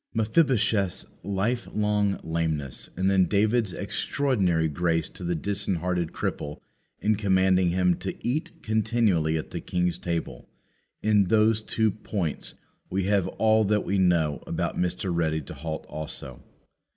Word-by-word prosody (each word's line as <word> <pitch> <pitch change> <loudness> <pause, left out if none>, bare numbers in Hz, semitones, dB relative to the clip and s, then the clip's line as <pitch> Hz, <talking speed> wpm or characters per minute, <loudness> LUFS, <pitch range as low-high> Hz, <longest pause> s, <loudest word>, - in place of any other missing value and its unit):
Mephibosheth's 110 - +2 0.2
life 105 +5 -1
long 105 -1 +1
lameness, 80 -4 -2
and 95 +1 +1
then 95 -1 +4
David's 105 +3 +2
extraordinary 95 - 0
grace 80 +1 0
to - - -11
the 85 0 0
disinherited 90 -1 -1
cripple 75 0 -4 0.4
in 110 +1 +3
commanding 95 -3 +3
him 90 0 +3
to - - -4
eat 155 +5 -3
continually 110 -8 +2
at 80 - -6
the - - -4
king's 90 -1 0
table; 85 -8 -4 0.5
in 105 -2 +4
those 110 +3 +3
two 110 0 +1
points 95 -6 -3 0.3
we 95 +1 0
have 100 -1 +2
all 110 0 +3
that 105 +1 +1
we 100 +1 +1
know 85 -5 +2
about - - -2
Mr. 90 +1 -1
Ready 80 -2 +1
to - - -9
halt 80 +3 -5
also. 70 -4 -6
95 Hz, 140 wpm, -26 LUFS, 85-105 Hz, 0.5 s, then